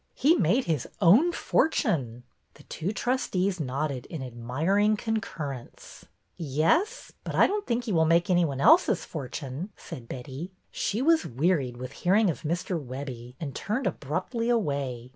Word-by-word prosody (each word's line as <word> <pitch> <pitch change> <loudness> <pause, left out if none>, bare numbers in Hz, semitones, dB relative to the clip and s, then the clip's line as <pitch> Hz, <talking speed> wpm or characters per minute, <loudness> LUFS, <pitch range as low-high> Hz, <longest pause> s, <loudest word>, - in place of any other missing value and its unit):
He 290 +6 +4
made 235 - +2
his 155 - -1
own 220 - +6
fortune." 145 - 0 0.3
The - - -16
two 180 +6 -4
trustees 200 -6 0
nodded 140 -2 -3
in 160 -6 -6
admiring 155 - +1
con 225 +1 -1
currence. 140 - -7 0.3
"Yes? 170 - 0
But - - -5
I - - +6
don't 410 +1 -2
think 240 +1 0
he 230 - -3
will 160 -3 +3
make 170 +2 +3
any 175 -2 +3
one 140 -5 -2
else's 280 - +5
fortune," 140 +3 -6
said 120 -2 -9
Betty. 135 +8 -7 0.2
She 225 +5 -1
was 325 +1 +3
wearied 135 -2 0
with 130 +1 -6
hearing 190 +5 +2
of - - -8
Mr. 170 +1 -2
Webbie, 125 -2 -7
and 140 -4 -5
turned 235 +6 -2
abruptly 185 - -2
away. 140 - -1
165 Hz, 155 wpm, -27 LUFS, 135-215 Hz, 0.3 s, own